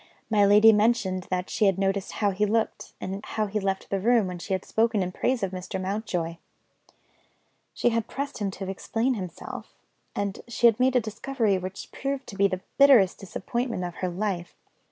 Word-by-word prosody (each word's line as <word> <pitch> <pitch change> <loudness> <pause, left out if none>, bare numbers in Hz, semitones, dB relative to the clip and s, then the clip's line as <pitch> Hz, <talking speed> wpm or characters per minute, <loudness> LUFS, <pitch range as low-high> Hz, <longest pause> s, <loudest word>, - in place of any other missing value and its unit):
My 205 -2 +5
lady 210 +2 +7
mentioned 210 -4 +1
that 180 0 -1
she 215 - +1
had 195 -2 +3
noticed 195 0 -1
how 205 -2 +1
he 195 +2 -1
looked, 225 +1 -1
and 195 +2 -5
how 215 - -2
he 210 +1 -2
left 195 -1 -2
the 195 - +1
room, 230 +1 +3
when 180 -1 -5
she 190 +3 -3
had 190 - -2
spoken 220 -3 +1
in 180 - -3
praise 245 +4 0
of 190 - -1
Mr. 185 0 -5
Mountjoy. 185 -4 -2 1.4
She - - +2
had 230 -1 -1
pressed 280 -2 -5
him 205 -2 -1
to 195 0 -6
explain 225 +6 -1
himself 185 -7 -7 0.4
and 200 -1 -2
she 235 0 0
had 230 -1 +6
made 260 +1 +3
a - - +6
discovery 225 -2 -1
which 185 +1 -7
proved 275 0 -3
to 200 - -8
be 200 0 +4
the 185 -1 -4 0.2
bitterest 255 -10 +6
disappointment 230 +2 -3
of 175 -1 -4
her 185 - -1
life. 180 -1 -3
200 Hz, 195 wpm, -26 LUFS, 190-230 Hz, 1.4 s, lady